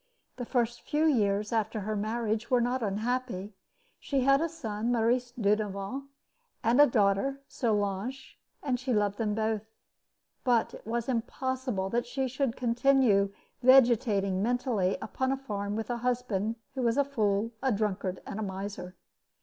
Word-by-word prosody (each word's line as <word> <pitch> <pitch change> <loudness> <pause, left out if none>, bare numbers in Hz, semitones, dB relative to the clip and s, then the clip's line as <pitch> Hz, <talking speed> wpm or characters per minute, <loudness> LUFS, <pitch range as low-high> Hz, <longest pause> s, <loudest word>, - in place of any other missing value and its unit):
The 245 -2 -5
first 240 -2 0
few 300 +2 0
years 210 -7 +2
after 220 -1 0
her 215 +2 -2
marriage 220 +1 -1
were 250 - +4
not 245 +2 0
unhappy. 215 -1 -2 0.5
She 275 -2 -1
had 275 +2 +4
a 330 - 0
son, 230 -8 -3
Maurice 240 +1 +1
Dudevant, 210 +3 -1 0.6
and 235 +5 +5
a 290 - +8
daughter, 215 +5 +2
Solange, 215 +3 -2 0.2
and 255 -3 0
she 255 0 -1
loved 205 -2 +1
them 210 -2 0
both. 220 -1 0 0.8
But 240 -4 +2
it - - -11
was 235 0 -2
impossible 250 -4 -2
that 240 +1 0
she 265 +2 -1
should 260 -1 -1
continue 240 -5 +3 0.3
vegetating 230 -7 +4
mentally 230 -5 +1
upon 260 0 -1
a 270 - 0
farm 205 -6 -4
with 225 +2 -3
a 240 - -1
husband 235 -3 -1 0.2
who 265 - -3
was 235 0 +1
a 285 - +4
fool, 215 -5 0
a 265 -1 +2
drunkard, 200 -3 -1
and 205 - -5
a - - -2
miser. 190 -1 -6
230 Hz, 155 wpm, -29 LUFS, 205-255 Hz, 0.8 s, a